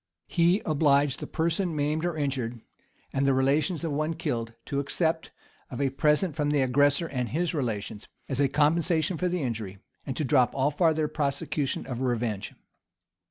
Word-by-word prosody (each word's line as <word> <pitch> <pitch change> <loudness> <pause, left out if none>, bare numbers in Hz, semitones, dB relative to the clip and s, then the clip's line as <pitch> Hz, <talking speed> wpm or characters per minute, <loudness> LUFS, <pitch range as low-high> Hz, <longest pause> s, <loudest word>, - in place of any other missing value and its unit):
He 175 +4 +2
obliged 145 -3 +3
the - - -6
person 165 +1 -1
maimed 150 +3 0
or 175 -2 -2
injured, 130 -5 -2 0.5
and 135 +1 +1
the 135 - +4
relations 150 +6 +1
of 165 - -1
one 155 +3 -1
killed, 120 -9 -3
to 140 - -2
accept 160 +3 -1 0.4
of 125 - -6
a 140 -2 +1
present 150 +4 +2
from 150 -2 0
the 145 -1 +2
aggressor 145 +5 +3
and 125 -6 -3
his 175 +4 -1
relations,[] 110 -7 -3 0.2
as 135 -1 -2
a 140 - +4
compensation 160 +4 +2
for 180 - +1
the 175 -3 -1
injury.[] 110 -6 -4 0.3
and 130 - -3
to 155 - 0
drop 130 -1 +3
all 135 +2 +2
farther 160 0 +2
prosecution 140 -1 -2
of 125 -1 -5
revenge. 120 -5 -1
145 Hz, 170 wpm, -27 LUFS, 130-160 Hz, 0.5 s, the